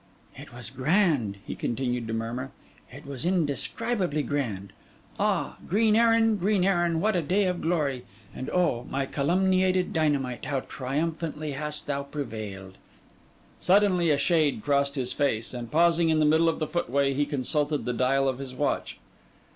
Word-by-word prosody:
'It - - -11
was 120 0 -8
grand,' 135 - +1
he - - -5
continued 125 -1 -2
to - - -4
murmur: 115 +4 -3 0.4
'it 140 +4 -11
was 140 -3 -6
indescribably 175 - 0
grand. 110 -10 -3 0.5
Ah, - - 0
green 215 +3 +3
Erin, 225 -1 +4
green 195 0 +1
Erin, 175 -4 +2
what 215 +3 +1
a 175 - +2
day 190 +6 +1
of 180 -1 -1
glory! 150 -7 0 0.3
and 130 - -6
oh, 130 -10 0
my 135 0 -1
calumniated 185 +6 +1
dynamite, 140 - 0
how 140 -2 -1
triumphantly 155 +3 -3
hast 150 +2 -4
thou 140 -1 -2
prevailed!' 110 -9 -7 0.8
Suddenly 185 -3 +3
a 145 - +3
shade 155 -8 +1
crossed 140 0 +1
his 125 -2 -1
face; 120 -6 -1
and 120 -2 -6
pausing 170 +2 +3
in 160 - +3
the 155 - +3
middle 160 +2 +4
of 165 - -1
the 155 - -1
footway, 140 -4 0
he 145 +1 0
consulted 145 +1 0
the 125 - -1
dial 135 +3 +2
of 130 -1 -1
his 130 -2 -7
watch. - - -2
145 Hz, 160 wpm, -27 LUFS, 130-175 Hz, 0.8 s, Erin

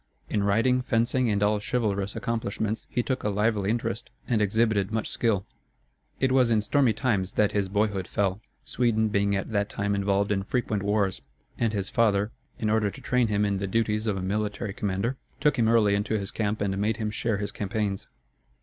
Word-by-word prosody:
In 105 - +1
riding, 115 +6 +3
fencing, 120 +1 +1
and 100 -1 +1
all 105 0 +2
chivalrous 100 -3 -1
accomplishments 110 -1 -2
he 120 - 0
took 130 0 -2
a 105 - +1
lively 105 -1 +1
interest 115 -1 -2 0.2
and 115 -3 +2
exhibited 105 -1 +2
much 110 -1 -1
skill. 105 -5 0 0.7
It 130 -1 +2
was 130 -2 +4
in 110 -2 +3
stormy 130 +2 +3
times 105 -5 0
that 105 -1 +2
his 100 -2 0
boyhood 100 -2 0
fell, 100 0 -1 0.2
Sweden 110 -3 +1
being 100 -1 +1
at 100 +3 -3
that 100 -1 0
time 100 0 -1
involved 100 0 +1
in 100 -1 +1
frequent 105 0 -1
wars, 100 -5 0 0.4
and 115 -2 +2
his 100 -2 -3
father, 105 -2 +2 0.3
in 110 - -2
order 105 -1 +2
to 100 - -10
train 125 -2 +1
him 105 -1 +1
in 100 -1 0
the 100 - -2
duties 110 +1 0
of 100 -2 0
a 95 - -3
military 100 +1 -2
commander, 105 +6 -2 0.2
took 150 -3 +2
him 115 - +4
early 110 -3 +4
into 105 +2 0
his 100 -1 -3
camp 105 -1 -2
and 100 -1 0
made 105 +1 0
him 110 -2 -2
share 110 0 -1
his 100 0 -3
campaigns. 105 -1 -2
105 Hz, 195 wpm, -27 LUFS, 100-115 Hz, 0.7 s, was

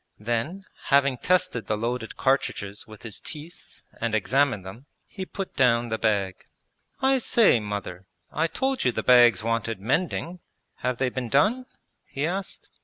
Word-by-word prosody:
Then, 120 - -2 0.2
having 140 -2 +3
tested 180 - +1
the 105 - 0
loaded 115 +1 -3
cartridges 105 -7 -1
with 110 -1 -13
his 115 -3 -4
teeth 155 +3 -9 0.2
and 115 -1 0
examined 115 -1 +1
them, 115 +9 -10 0.2
he 190 -2 -7
put 195 -1 -6
down 120 -2 +3
the 110 0 -2
bag. 100 -4 0 0.6
'I 265 0 +3
say, 225 - +4
Mother, 100 -3 -6 0.2
I 165 +2 +1
told 265 +9 -1
you 125 - +3
the - - -3
bags 120 -5 +6
wanted 115 -2 -1
mending; 170 - -1 0.4
have 125 -1 -2
they 130 0 +1
been 125 -1 -4
done?' 225 - +2 0.4
he 140 +1 -3
asked. 190 +4 -4
125 Hz, 155 wpm, -25 LUFS, 110-165 Hz, 0.6 s, bags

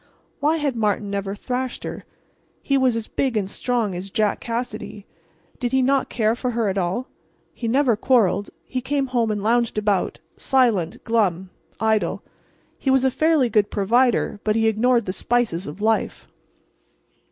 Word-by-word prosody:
Why 305 +3 +2
had 290 -5 -1
Martin 210 -2 0
never 200 0 -3
thrashed 250 +4 -4
her? - - -6 0.6
He 275 - +1
was 260 -3 +3
as 230 -1 -3
big 260 -5 -1
and 200 -3 0
strong 230 -1 -1
as 180 +2 -6
Jack 210 +1 0
Cassidy. 230 -3 -5 0.5
Did 245 -2 -2
he 265 0 +3
not 270 +1 +2
care 220 -1 +1
for 250 +1 -3
her 230 -3 0
at 190 - -2
all? 185 +8 -1 0.5
He 235 - -5
never 255 0 +3
quarrelled; 210 -4 +2 0.2
he 255 - -3
came 275 +2 0
home 240 -3 0
and 205 -2 -2
lounged 235 0 +1
about, 205 -2 0 0.2
silent, 230 -11 +1
glum, 190 -5 0 0.3
idle. 220 -1 0 0.6
He 270 - -1
was 265 0 +4
a 265 - +3
fairly 310 -2 +3
good 210 -2 +2
provider, 230 +1 +2
but 215 -1 +1
he 225 0 +3
ignored 235 +1 +2
the 185 - -3
spices 230 -6 0
of 150 +8 -8
life. 220 +1 0
230 Hz, 165 wpm, -22 LUFS, 205-255 Hz, 0.6 s, was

